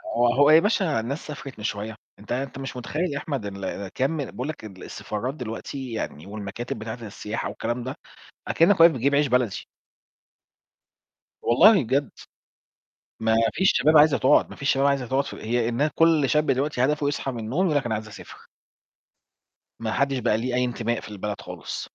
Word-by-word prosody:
هو 120 Hz, +1 st, +4 dB
هو 145 Hz, +2 st, +5 dB
يا 155 Hz, +1 st, +8 dB
باشا 185 Hz, -, +1 dB
الناس 140 Hz, +9 st, -5 dB
سافرت 140 Hz, -4 st, -8 dB
من -, -, -8 dB
شوية، 105 Hz, 0 st, -3 dB, 0.2 s
أنت 105 Hz, -, -11 dB
أنت 130 Hz, +1 st, -3 dB
مش 135 Hz, -2 st, -6 dB
متخيّل 150 Hz, +6 st, -2 dB
يا -, -, -3 dB
أحمد 140 Hz, -8 st, -4 dB
اللي 100 Hz, 0 st, -5 dB
كام 140 Hz, +5 st, 0 dB
بيقول 125 Hz, +2 st, -6 dB
لك 155 Hz, -8 st, -7 dB
ال 95 Hz, -3 st, -11 dB
السفارات 120 Hz, +6 st, -4 dB
دلوقتي 125 Hz, +1 st, -6 dB
يعني 80 Hz, -8 st, -5 dB
والمكاتب 105 Hz, +3 st, -6 dB
بتاعة 110 Hz, +1 st, -5 dB
السياحة 105 Hz, +1 st, -5 dB
والكلام 120 Hz, +1 st, -3 dB
ده 130 Hz, -, -5 dB, 0.5 s
أكنّك 170 Hz, +3 st, +3 dB
واقف 165 Hz, 0 st, +9 dB
بتجيب 140 Hz, +1 st, +1 dB
عيش 145 Hz, 0 st, +3 dB
بلدي. 125 Hz, -5 st, 0 dB, 1.8 s
والله 175 Hz, -, +6 dB
بجد. 135 Hz, +3 st, 0 dB, 1.1 s
ما 110 Hz, 0 st, +2 dB, 0.2 s
فيش 190 Hz, +3 st, +3 dB
شباب 155 Hz, +1 st, +4 dB
عايزة 150 Hz, -3 st, +6 dB
تقعُد، 130 Hz, -, +4 dB
ما -, -, -10 dB
فيش 140 Hz, -, 0 dB
شباب 135 Hz, +1 st, +2 dB
عايزة 140 Hz, -3 st, +1 dB
تقعُد 135 Hz, +3 st, +1 dB
ف -, -, -7 dB
هي 115 Hz, +1 st, -1 dB
النا 135 Hz, +6 st, +1 dB
كل 165 Hz, -4 st, +4 dB
شاب 150 Hz, +2 st, +2 dB
دلوقتي 135 Hz, -1 st, +1 dB
هدفه 150 Hz, 0 st, +1 dB
يصحي 140 Hz, -1 st, -2 dB
من 120 Hz, -, -6 dB
النوم 130 Hz, -, -1 dB
يقول 155 Hz, -4 st, +1 dB
لك 135 Hz, -, 0 dB
أنا 110 Hz, -, -1 dB
عايز 110 Hz, 0 st, -5 dB
أسافر. 105 Hz, -, -12 dB, 1.3 s
ما 110 Hz, -1 st, -3 dB
حدش 140 Hz, +2 st, +1 dB
بقى 110 Hz, -3 st, +1 dB
ليه 125 Hz, +2 st, -3 dB
أي 125 Hz, 0 st, +2 dB
انتماء 120 Hz, -1 st, -2 dB
في -, -, -10 dB
البلد 105 Hz, 0 st, -5 dB
خالص. 90 Hz, -5 st, -7 dB
125 Hz, 185 wpm, -25 LUFS, 110-145 Hz, 1.8 s, واقف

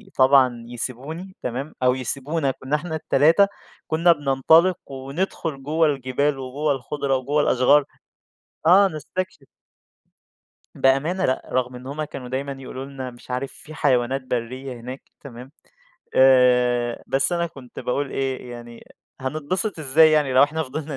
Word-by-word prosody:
طبعًا 130 Hz, -3 st, +4 dB
يسيبوني، 135 Hz, +10 st, -6 dB
تمام، 130 Hz, +5 st, -4 dB
أو 125 Hz, 0 st, +4 dB
يسيبونا، 140 Hz, +3 st, -2 dB
كنّا 130 Hz, +2 st, -3 dB
إحنا 160 Hz, +2 st, -4 dB
ال3 160 Hz, +5 st, +4 dB, 0.4 s
كنّا 165 Hz, +2 st, +4 dB
بننطلِق 160 Hz, +4 st, +3 dB
وندخُل 135 Hz, +1 st, -4 dB
جوَّه 160 Hz, +3 st, +2 dB
الجبال، 140 Hz, 0 st, 0 dB
وجوَّه 140 Hz, +4 st, -2 dB
الخُضرة، 135 Hz, +1 st, -1 dB
وجوَّه 140 Hz, +4 st, 0 dB
الأشجار، 140 Hz, +2 st, +4 dB, 0.8 s
آه 195 Hz, +4 st, +7 dB
نستكشف. 155 Hz, -1 st, -6 dB, 1.3 s
بأمانة 150 Hz, +8 st, +2 dB
لأ، 130 Hz, -, -2 dB
رَغم 125 Hz, 0 st, 0 dB
إن 125 Hz, +1 st, -10 dB
هُم 145 Hz, +3 st, -4 dB
كانوا 135 Hz, -4 st, -8 dB
دايمًا 135 Hz, +2 st, -3 dB
يقولوا 130 Hz, 0 st, -7 dB
لنا 130 Hz, -2 st, -7 dB
مش 120 Hz, +1 st, -13 dB
عارف 130 Hz, +2 st, -3 dB
في 155 Hz, -, -13 dB
حيوانات 130 Hz, 0 st, +1 dB
برّية 130 Hz, +1 st, -4 dB
هناك، 125 Hz, +3 st, -9 dB
تمام، 125 Hz, -1 st, -11 dB, 0.6 s
آآ 125 Hz, -2 st, +4 dB
بس 135 Hz, +6 st, +1 dB
أنا 170 Hz, 0 st, 0 dB
كنت 135 Hz, -7 st, -13 dB
باقول 140 Hz, +2 st, -2 dB
إيه، 130 Hz, -2 st, -3 dB
يعني 120 Hz, -1 st, -10 dB, 0.4 s
هنتبسط 155 Hz, +8 st, -2 dB
إزاي 155 Hz, +2 st, +5 dB
يعني 150 Hz, -3 st, +2 dB
لو 130 Hz, +1 st, +6 dB
إحنا 155 Hz, +3 st, +1 dB
فضِلنا 150 Hz, +1 st, -5 dB
135 Hz, 135 wpm, -23 LUFS, 130-155 Hz, 1.3 s, آه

